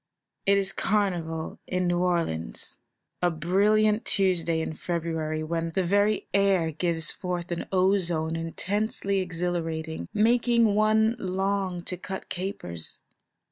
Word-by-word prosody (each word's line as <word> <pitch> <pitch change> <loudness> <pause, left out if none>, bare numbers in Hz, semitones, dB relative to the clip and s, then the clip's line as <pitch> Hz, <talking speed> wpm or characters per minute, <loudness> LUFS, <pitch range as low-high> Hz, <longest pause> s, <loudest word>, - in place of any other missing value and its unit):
It 200 0 +6
is 195 -1 +1
Carnival 175 -6 -1
in 185 0 0
New 175 0 +1
Orleans; 165 - -1 0.4
a 175 - +4
brilliant 210 +7 +3
Tuesday 175 -4 +1
in 160 - -2
February, 160 -2 -2
when 165 +1 -2
the 190 - +2
very 205 +3 +2
air 195 -5 +3
gives 165 0 -1
forth 180 -1 -4
an 170 - -3
ozone 180 -4 +2
intensely 195 +4 -1
exhilarating, 165 -3 -3
making 230 0 +3
one 220 +2 +3
long 190 -1 -1
to 180 - -3
cut 190 +2 -6
capers. 175 - -5
180 Hz, 120 wpm, -27 LUFS, 165-200 Hz, 0.4 s, It